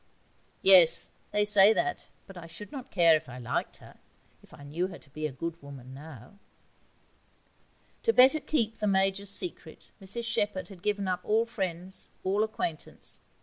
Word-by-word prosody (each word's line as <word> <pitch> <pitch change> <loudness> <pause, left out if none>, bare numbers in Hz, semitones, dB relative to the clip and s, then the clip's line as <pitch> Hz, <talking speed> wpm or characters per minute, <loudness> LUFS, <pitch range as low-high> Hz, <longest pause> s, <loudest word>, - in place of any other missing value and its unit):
'Yes, 175 -4 +7 0.2
they 210 0 +1
say 205 0 +6
that 360 +9 -2 0.2
but 195 - -13
I 170 -2 -9
should 170 +8 -9
not 265 -3 -8
care 170 -3 +5
if 155 - -4
I 125 - -9
liked 120 -2 -3
her, - - -17 0.4
if - - -21
I 145 - -14
knew 160 +6 -2
her 190 - -10
to 135 - -22
be 155 +1 -3
a - - -8
good 165 +5 -6
woman 135 -3 -11
now.' 145 - -12 1.6
To 455 - +2
better 270 - +6
keep 225 -8 -1
the 210 - -1
Major's 195 0 +1
secret, 350 - -4
Mrs 200 +5 -1
Shepherd 210 -5 -1
had 190 -4 -13
given 205 -1 -1
up 185 -1 -1
all 220 +2 +2
friends, 185 -4 -4
all 200 +3 +1
acquaintance. 170 -7 -4
190 Hz, 170 wpm, -28 LUFS, 165-210 Hz, 1.6 s, Yes